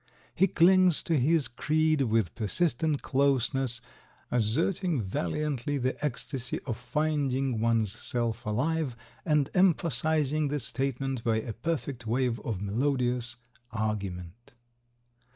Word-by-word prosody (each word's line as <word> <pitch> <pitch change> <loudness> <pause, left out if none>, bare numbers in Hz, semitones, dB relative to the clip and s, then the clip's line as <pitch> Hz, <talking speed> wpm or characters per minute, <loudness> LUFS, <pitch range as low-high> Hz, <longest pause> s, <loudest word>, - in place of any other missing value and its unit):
He 190 - +3
clings 180 -1 +4
to 160 -4 +1
his 150 +3 +2
creed 155 +4 +1
with 110 -7 +1
persistent 145 - 0
closeness, 135 -2 +2 0.5
asserting 155 - +1
valiantly 130 - -2
the 130 +2 -2
ecstasy 130 -2 -2
of 120 -5 -2
finding 135 -4 -1
one's 115 -3 +2
self 115 +1 -2
alive 135 +3 -1 0.3
and 150 -4 +2
emphasizing 155 -4 +2
the 145 +1 -1
statement 135 0 -2
by 115 -1 +1
a 115 - -6
perfect 130 -2 -4
wave 120 0 0
of 105 -4 -4
melodious 125 +1 0 0.4
argument. 105 -1 -4
130 Hz, 110 wpm, -28 LUFS, 115-150 Hz, 0.5 s, clings